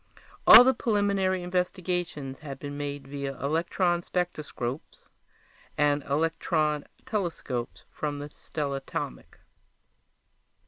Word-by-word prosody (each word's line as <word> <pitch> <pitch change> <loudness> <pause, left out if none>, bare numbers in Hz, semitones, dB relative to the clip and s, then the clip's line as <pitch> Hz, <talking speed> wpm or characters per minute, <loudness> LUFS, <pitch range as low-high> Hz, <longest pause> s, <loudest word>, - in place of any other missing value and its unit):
All 230 +3 +12
the 260 +1 +4
preliminary 200 -5 +1
investigations 180 -6 -2
had 140 -3 -7
been 145 +1 -6
made 145 -1 -5
via 140 -1 -4
electronspectroscopes 165 -2 -2 0.7
and 145 -1 +2
electrontelescopes 150 - -2
from 145 -1 -3
the 145 +1 -6
stellatomic. 140 - -5
150 Hz, 80 wpm, -28 LUFS, 140-180 Hz, 0.7 s, All